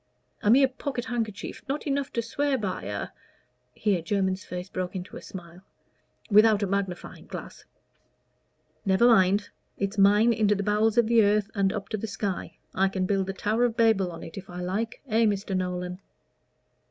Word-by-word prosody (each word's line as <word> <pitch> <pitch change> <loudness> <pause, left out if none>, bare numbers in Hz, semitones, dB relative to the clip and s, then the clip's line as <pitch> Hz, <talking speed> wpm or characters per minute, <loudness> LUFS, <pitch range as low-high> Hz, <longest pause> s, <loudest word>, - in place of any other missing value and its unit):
"A 205 - +1
mere 265 +4 +6
pocket 260 -1 -5
handkerchief, 225 -5 -4
not 285 +2 -2
enough 280 -1 -1
to 235 - -1
swear 280 +4 0
by 195 -5 -3
a - - -4 0.3
" - - -44
here 200 -5 +2
Jermyn's 190 +2 -1
face 180 +1 -6
broke 185 0 -4
into 185 +1 -6
a - - -7
smile 175 -1 -10 0.7
"without 210 0 +6
a - - +3
magnifying 195 -2 -4
glass." - - -9 1.2
"Never 190 +3 +3
mind. 205 -3 +4 0.3
It's 200 +1 -2
mine 210 +4 +5
into 210 -2 +2
the 200 - -2
bowels 210 +2 +2
of 235 - +5
the 230 0 +5
earth 205 +1 +2
and 195 -2 +1
up 200 -1 -4
to 215 - -2
the 225 - -4
sky. 200 -3 -4 0.2
I 195 +1 +2
can 190 -1 -1
build 195 0 0
the 195 - -3
Tower 215 +5 0
of 235 -1 -2
Babel 220 -6 +3
on 165 - -9
it 165 - -7
if 195 - -13
I 175 0 -7
like 200 +6 -3
eh, 225 -1 +3
Mr. 200 -2 0
Nolan?" 180 0 -3
205 Hz, 185 wpm, -27 LUFS, 190-225 Hz, 1.2 s, mere